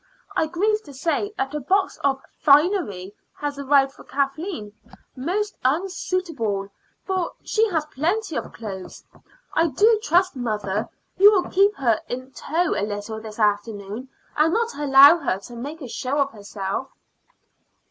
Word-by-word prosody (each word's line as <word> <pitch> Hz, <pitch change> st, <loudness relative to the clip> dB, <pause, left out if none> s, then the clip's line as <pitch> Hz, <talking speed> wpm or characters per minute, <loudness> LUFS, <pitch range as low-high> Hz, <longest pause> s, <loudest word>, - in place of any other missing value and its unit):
I 315 Hz, -, +2 dB
grieve 420 Hz, +6 st, +1 dB
to 285 Hz, -3 st, -12 dB
say 330 Hz, +8 st, -1 dB
that 270 Hz, +2 st, -2 dB
a 300 Hz, -, -2 dB
box 380 Hz, +8 st, 0 dB
of 270 Hz, -1 st, +1 dB, 0.2 s
finery 280 Hz, -, +3 dB, 0.2 s
has 290 Hz, -1 st, -4 dB
arrived 275 Hz, -1 st, +3 dB
for -, -, -15 dB
Kathleen 275 Hz, -, -3 dB, 0.4 s
most 390 Hz, +11 st, -2 dB
unsuitable, 305 Hz, -, -1 dB, 0.4 s
for 375 Hz, -3 st, -1 dB
she 445 Hz, 0 st, +2 dB
has 320 Hz, -5 st, 0 dB
plenty 325 Hz, +6 st, -2 dB
of -, -, -4 dB
clothes. 195 Hz, -5 st, -8 dB, 0.5 s
I 330 Hz, -, +3 dB
do 420 Hz, -, +4 dB
trust, 360 Hz, 0 st, +2 dB
mother, 215 Hz, -4 st, -2 dB, 0.3 s
you 400 Hz, +2 st, +8 dB
will 380 Hz, -4 st, +1 dB
keep 400 Hz, +2 st, +4 dB
her 235 Hz, -, +1 dB
in 255 Hz, +2 st, -6 dB
tow 330 Hz, +5 st, -1 dB
a -, -, -1 dB
little 205 Hz, +1 st, -4 dB
this 215 Hz, -1 st, -9 dB
afternoon, 210 Hz, +2 st, -1 dB, 0.3 s
and 310 Hz, +2 st, +3 dB
not 460 Hz, +4 st, 0 dB
allow 285 Hz, +3 st, +7 dB
her 265 Hz, -, -1 dB
to 240 Hz, -, -11 dB
make 290 Hz, +6 st, -7 dB
a -, -, -6 dB
show 255 Hz, +4 st, -3 dB
of 280 Hz, -1 st, +1 dB
herself." 205 Hz, +3 st, -5 dB
280 Hz, 150 wpm, -23 LUFS, 225-355 Hz, 0.5 s, you